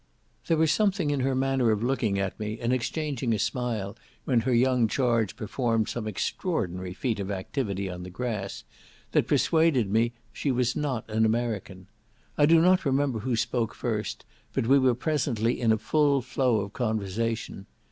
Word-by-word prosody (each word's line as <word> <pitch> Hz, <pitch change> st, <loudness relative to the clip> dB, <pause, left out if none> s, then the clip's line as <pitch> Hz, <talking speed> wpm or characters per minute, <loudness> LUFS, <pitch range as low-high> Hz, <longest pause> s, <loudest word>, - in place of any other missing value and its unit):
There 165 Hz, -, +2 dB
was 160 Hz, -1 st, +3 dB
something 195 Hz, -7 st, +1 dB
in 145 Hz, -, 0 dB
her 130 Hz, 0 st, +1 dB
manner 135 Hz, -2 st, +2 dB
of 110 Hz, 0 st, +1 dB
looking 120 Hz, -6 st, 0 dB
at 100 Hz, +1 st, -2 dB
me, 110 Hz, +1 st, -4 dB
and 120 Hz, +1 st, 0 dB
exchanging 130 Hz, -2 st, -1 dB
a -, -, -1 dB
smile 110 Hz, -2 st, -2 dB, 0.3 s
when 125 Hz, -3 st, +3 dB
her 125 Hz, +3 st, -1 dB
young 125 Hz, -1 st, +3 dB
charge 115 Hz, -4 st, +1 dB
performed 115 Hz, 0 st, -1 dB
some 115 Hz, -3 st, -4 dB
extraordinary 95 Hz, -, -2 dB
feat 115 Hz, -2 st, -2 dB
of 100 Hz, -1 st, -4 dB
activity 100 Hz, 0 st, -3 dB
on 90 Hz, -1 st, -6 dB
the 90 Hz, -, -7 dB
grass, 105 Hz, -1 st, -4 dB, 0.5 s
that -, -, +2 dB
persuaded 160 Hz, -11 st, +2 dB
me 115 Hz, +2 st, +2 dB, 0.2 s
she 145 Hz, -, -2 dB
was 125 Hz, -1 st, +1 dB
not 135 Hz, -6 st, -2 dB
an 110 Hz, 0 st, +1 dB
American. 110 Hz, -5 st, -1 dB, 0.5 s
I 145 Hz, -, +4 dB
do 165 Hz, +1 st, +6 dB
not 185 Hz, +1 st, +4 dB
remember 135 Hz, -4 st, +1 dB
who 120 Hz, +2 st, -1 dB
spoke 115 Hz, -1 st, -1 dB
first, 110 Hz, -3 st, -3 dB, 0.3 s
but -, -, 0 dB
we 135 Hz, +4 st, +5 dB
were 130 Hz, -2 st, +3 dB
presently 125 Hz, -5 st, 0 dB
in 115 Hz, -2 st, +3 dB
a 110 Hz, -, +3 dB
full 140 Hz, +4 st, +2 dB
flow 125 Hz, -3 st, +1 dB
of 100 Hz, +1 st, -6 dB
conversation. 110 Hz, -2 st, -2 dB
120 Hz, 175 wpm, -27 LUFS, 110-135 Hz, 0.5 s, do